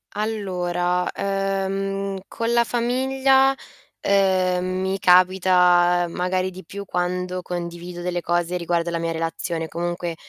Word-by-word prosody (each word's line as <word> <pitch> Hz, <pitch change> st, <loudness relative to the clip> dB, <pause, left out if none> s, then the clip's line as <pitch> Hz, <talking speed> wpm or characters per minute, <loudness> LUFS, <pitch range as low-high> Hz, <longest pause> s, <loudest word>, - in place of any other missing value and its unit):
Allora, 180 Hz, -4 st, -1 dB
ehm, 195 Hz, 0 st, -2 dB
con 230 Hz, 0 st, -3 dB
la 235 Hz, 0 st, +4 dB
famiglia, 265 Hz, +3 st, +2 dB, 0.5 s
ehm, 185 Hz, -2 st, +2 dB
mi 190 Hz, +1 st, -1 dB
capita 180 Hz, -1 st, +4 dB
magari 185 Hz, +1 st, -1 dB
di 185 Hz, 0 st, -11 dB
più 200 Hz, +3 st, -7 dB
quando 180 Hz, 0 st, -2 dB
condivido 175 Hz, 0 st, -6 dB
delle 175 Hz, 0 st, -2 dB
cose 175 Hz, +1 st, 0 dB
riguardo 170 Hz, 0 st, -1 dB
la 170 Hz, -, -2 dB
mia 165 Hz, 0 st, -2 dB
relazione. 165 Hz, 0 st, -3 dB
Comunque 175 Hz, 0 st, -3 dB
180 Hz, 115 wpm, -22 LUFS, 175-195 Hz, 0.5 s, la